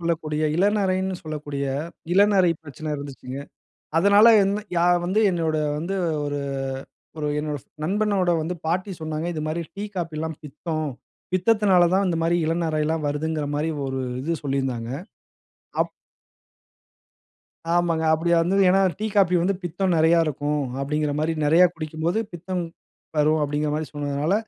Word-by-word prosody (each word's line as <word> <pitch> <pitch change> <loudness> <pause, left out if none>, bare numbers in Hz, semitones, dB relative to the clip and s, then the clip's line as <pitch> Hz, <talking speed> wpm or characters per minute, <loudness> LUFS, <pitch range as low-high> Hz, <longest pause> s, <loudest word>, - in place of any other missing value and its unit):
சொல்லக்கூடிய 160 -2 -1
இளநரைன்னு 190 -1 +1
சொல்லக்கூடிய 145 -3 -4 0.5
இளநரை 195 -3 +5
பிரச்சன 155 +1 -6
இருந்துச்சுங்க. 135 -2 -7 0.6
அதனால 200 +4 +6 0.2
என்ன 200 +2 0 0.2
யா 170 - +3 0.2
வந்து 190 +5 +1
என்னோட 160 -2 0 0.2
வந்து 175 +5 -3 0.3
ஒரு 145 0 -2 0.8
ஒரு 150 - -2
என்னோட 150 -1 -2 0.3
நண்பனோட 200 -1 +1
வந்து 175 +3 -3
பாட்டி 185 +5 -1
சொன்னாங்க, 155 0 -3
"இது 155 - -4
மாதிரி 160 +2 -2
டீ, 200 - -4
காஃபில 160 -3 -3 0.2
பித்தம். 155 +2 -4 0.5
பித்தத்தினால 190 -1 +4
தான் 195 +1 +3
இந்த 170 - 0
மாரி 170 +1 +2
இளநரைலாம் 160 -1 0
வருதுங்கிற" 150 +1 -1
மாரி 155 +2 0 0.2
ஒரு 135 0 -3 0.2
இது 165 +4 -1
சொல்லியிருந்தாங்க. 135 -4 -2 0.9
அப் - - -8 1.8
ஆமாங்க. 170 -2 +1
அப்படி 165 +2 -1
வந்து 180 +4 +1
ஏனா 190 +2 +4 0.2
டீ, 215 - -1
காஃபி 185 -2 +5
வந்து 195 +3 +1
பித்தம் 180 +2 0
நெறைய 160 +1 +5
இருக்கும். 145 0 -1 0.2
அப்படீங்குற 150 +1 -1
மாரி 160 +1 +1
நெறைய 165 +5 +6
குடிக்கும்போது 160 +4 -2
பித்தம் 180 +1 -3 0.5
வரும் 155 +1 +3
அப்படீங்குற 150 +1 0
மாரி 155 +1 -2
சொன்னதுனால 145 +4 0
160 Hz, 130 wpm, -24 LUFS, 150-180 Hz, 1.8 s, அதனால